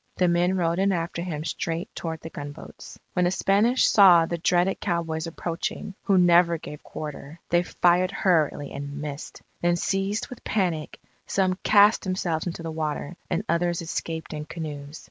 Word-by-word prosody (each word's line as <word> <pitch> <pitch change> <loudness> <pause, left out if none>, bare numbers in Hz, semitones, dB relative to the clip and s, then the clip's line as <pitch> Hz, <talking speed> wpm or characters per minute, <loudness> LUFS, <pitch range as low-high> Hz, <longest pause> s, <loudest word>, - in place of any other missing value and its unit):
The 180 - +3
men 175 +2 +2
rode 170 0 +1
in 195 +1 +3
after 170 -1 -2
him 160 -4 -4
straight 165 +1 -3
toward 160 -1 -5
the 165 - -8
gunboats. 145 0 -9 0.2
When 180 -1 +2
the - - +3
Spanish 205 +7 +3
saw 180 -5 +7
the 170 +1 -4
dreaded 175 +3 +2
cowboys 165 -3 -2
approaching, 170 +3 -4
who 195 - +4
never 175 -1 +5
gave 150 -1 -9
quarter, 150 +1 -8
they 175 0 +4
fired 180 +1 +2
hurriedly 160 -7 +1
and 140 +1 -6
missed. 150 0 -7 0.2
Then 175 0 +3
seized 195 +5 -1
with 250 - -10
panic, 175 -7 -1 0.3
some 185 -1 +1
cast 205 +1 +5
themselves 180 -3 -2
into 170 -1 -5
the 165 - -4
water, 155 +1 -3
and 180 +2 -1
others 170 0 0
escaped 160 0 -4
in 150 0 -5
canoes. 150 -2 -7
170 Hz, 165 wpm, -25 LUFS, 160-185 Hz, 0.3 s, saw